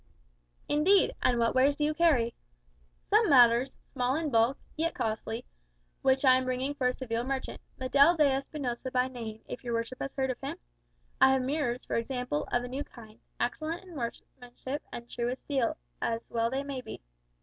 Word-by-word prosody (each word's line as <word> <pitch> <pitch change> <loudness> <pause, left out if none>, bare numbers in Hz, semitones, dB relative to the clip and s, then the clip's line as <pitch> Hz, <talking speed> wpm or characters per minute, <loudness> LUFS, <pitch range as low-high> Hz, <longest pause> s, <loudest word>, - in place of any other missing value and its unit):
"Indeed! 350 +7 +4
And 245 -1 +3
what 230 0 +2
wares 270 +2 +4
do 295 - 0
you 305 - +1
carry?" 295 -8 +3 0.8
"Some 430 -1 +5
matters, 245 -1 +6 0.2
small 250 +1 +1
in 310 -2 -1
bulk, 230 +3 +3 0.2
yet 330 +2 -1
costly, 225 +1 -3 0.6
which 265 +1 +3
I 255 -1 +7
am 260 - -1
bringing 255 +2 -1
for 265 -3 0
a 250 - +1
Seville 235 -2 -2
merchant 265 +1 -4 0.2
Medel 280 +6 +5
de 305 - +5
Espinosa 265 -2 -2
by 255 0 +1
name, 225 -4 -7
if 250 - -7
your 240 -2 -2
worship 230 +2 -3
has 275 - -4
heard 265 -1 0
of 250 - -8
him? - - -4 0.6
I 265 - +7
have 265 -1 +1
mirrors, 255 -3 -1
for - - -1
example, 250 - -2
of 245 0 +1
a - - -4
new 265 +3 -4
kind; 220 -5 -15 0.2
excellent 310 +8 -2
in 365 -2 -13
workmanship, 250 +1 -6
and 235 - -7
true 240 0 -2
as 255 - -3
steel, 265 -5 -1 0.2
as 230 0 -2
well 230 0 +1
they 265 +3 -2
may 275 -2 -5
be." - - -9
255 Hz, 190 wpm, -30 LUFS, 240-280 Hz, 0.8 s, I